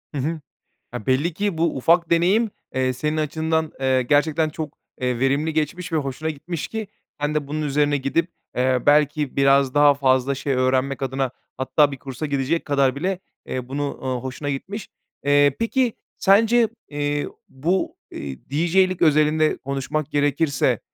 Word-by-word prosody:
Hı - - -2
hı. 160 +4 -2 0.6
Ya, 120 -4 -6
belli 140 +7 +2
ki 200 -2 -1
bu 165 -2 +1
ufak 170 +5 +3
deneyim, 190 +7 +3 0.2
eee, 130 0 +1
senin 150 +5 -2
açından, 160 +1 -1
eee, 130 -1 +2
gerçekten 150 +4 +2
çok, 155 0 -7 0.2
eee, 125 -1 0
verimli 140 +5 +1
geçmiş 160 +3 -2
ve - - +2
hoşuna 145 +2 -2
gitmiş 160 +2 -5
ki 220 -1 -4 0.3
sen 145 +1 -1
de 150 -2 -1
bunun 155 +2 -3
üzerine 145 0 +1
gidip, 140 +5 0 0.3
eee, 130 0 +2
belki 150 -1 +3
biraz 135 -1 +4
daha 145 -1 +6
fazla 130 -1 +2
şey 140 +1 -2
öğrenmek 130 +2 +1
adına 135 0 -1 0.3
hatta 145 +3 +2
bir 135 - -6
kursa 135 +3 -5
gidecek 145 +3 -1
kadar 140 -2 +2
bile, 185 +5 -1 0.3
eee, 125 -1 -4
bunu, 140 +1 -3
eee, 130 - -3
hoşuna 130 +2 -4
gitmiş. 195 +10 -5 0.4
Eee, 145 -1 +4
peki 240 +1 +1 0.3
sence, 225 +4 +4 0.2
eee, 145 0 -1 0.2
bu, 165 +8 -1
eee, 70 -2 -6
DJ'lik 175 +5 +2
özelinde 155 0 +3
konuşmak 140 +2 -3
gerekirse, 145 -1 +1
145 Hz, 160 wpm, -22 LUFS, 135-160 Hz, 0.6 s, daha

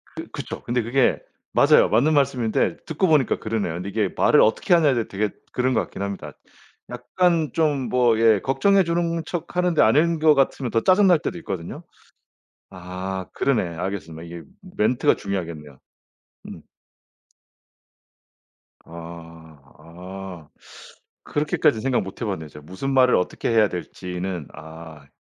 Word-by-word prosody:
그 - - -7
그쵸. - - -7
근데 120 +1 -1
그게 120 +3 +1 0.3
맞아요. - - +5
맞는 130 +9 +3
말씀인데 130 -6 +1
듣고 160 +4 0
보니까 150 -6 +2
그러네요. 110 -6 -2
근데 90 +3 -5
이게 105 -1 0
말을 150 - +4
어떻게 110 +10 +2
하냐에 155 -5 +4
되게 105 +2 -2 0.2
그런 130 +1 0
것 - - +2
같긴 - - -8
합니다. 100 -1 -5 0.6
약간 155 +5 0
좀 145 -5 0
뭐 120 -3 +2
예 110 -2 +5
걱정해주는 170 +1 +1
척 175 0 -6
하는데 180 -3 +2
아닌 160 +8 +3
것 155 -1 +5
같으면 135 -2 0
더 115 - +1
짜증날 185 - +4
때도 175 +2 -4
있거든요? 90 - -6 0.9
아 90 +1 -6
그러네. 135 -7 +1
알겠습니다. 85 -3 -5
이게 85 0 -9 0.4
멘트가 120 +4 +2
중요하겠네요. 80 -8 -6 0.7
음. 205 - -9 2.2
아 85 -1 -11 0.2
아 90 +1 -10 0.7
그렇게까진 145 -5 0
생각 130 0 +1
못해봤네요. 95 -5 -5
제가 75 - -13
무슨 115 - -4
말을 130 -1 +5
어떻게 90 - -1
해야 110 -2 +4
될지는 90 -2 -5
아 80 -1 -12
110 Hz, 300 characters per minute, -23 LUFS, 90-145 Hz, 2.2 s, 맞아요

